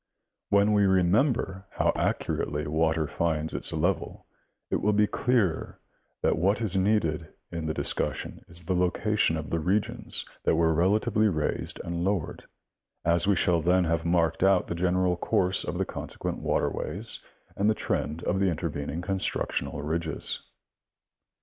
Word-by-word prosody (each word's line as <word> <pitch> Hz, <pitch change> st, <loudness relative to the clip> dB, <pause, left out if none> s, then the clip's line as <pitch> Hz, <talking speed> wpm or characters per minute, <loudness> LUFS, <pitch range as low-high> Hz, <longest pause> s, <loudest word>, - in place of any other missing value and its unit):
When 100 Hz, +1 st, +4 dB
we 100 Hz, -1 st, +4 dB
remember 95 Hz, -, +2 dB
how -, -, +2 dB
accurately 75 Hz, +1 st, -1 dB
water 80 Hz, +1 st, +1 dB
finds 80 Hz, 0 st, -1 dB
its -, -, -2 dB
level, -, -, -1 dB, 0.5 s
it -, -, +2 dB
will 105 Hz, +1 st, +1 dB
be 105 Hz, +1 st, +4 dB
clearer 110 Hz, -6 st, 0 dB, 0.4 s
that -, -, +2 dB
what 100 Hz, +6 st, +2 dB
is 105 Hz, -5 st, -1 dB
needed 95 Hz, -6 st, +1 dB, 0.2 s
in 85 Hz, -2 st, -4 dB
the 80 Hz, -, 0 dB
discussion -, -, -2 dB
is 85 Hz, 0 st, -2 dB
the 95 Hz, -, 0 dB
location 90 Hz, 0 st, +1 dB
of 80 Hz, 0 st, -6 dB
the 85 Hz, -, +1 dB
regions 95 Hz, +6 st, -1 dB, 0.2 s
that -, -, +3 dB
were 80 Hz, 0 st, +3 dB
relatively 105 Hz, +5 st, +2 dB
raised 80 Hz, -7 st, -1 dB
and 85 Hz, 0 st, -3 dB
lowered, 95 Hz, -3 st, -2 dB, 0.6 s
as 85 Hz, +2 st, +3 dB
we 100 Hz, -, +4 dB
shall 85 Hz, -1 st, +2 dB
then 90 Hz, +3 st, +3 dB
have 85 Hz, -1 st, 0 dB
marked 85 Hz, -1 st, +1 dB
out 95 Hz, -1 st, +4 dB
the -, -, -4 dB
general 90 Hz, +1 st, +1 dB
course 90 Hz, +1 st, +1 dB
of -, -, -3 dB
the -, -, 0 dB
consequent -, -, -5 dB
water -, -, 0 dB
ways -, -, -4 dB, 0.3 s
and 100 Hz, +2 st, +2 dB
the 110 Hz, -, +2 dB
trend 80 Hz, -5 st, -2 dB
of 95 Hz, -, 0 dB
the 95 Hz, -1 st, +3 dB
intervening 80 Hz, -1 st, -3 dB
constructional 95 Hz, -6 st, -1 dB
ridges. 80 Hz, +1 st, -3 dB
90 Hz, 155 wpm, -27 LUFS, 80-100 Hz, 0.6 s, When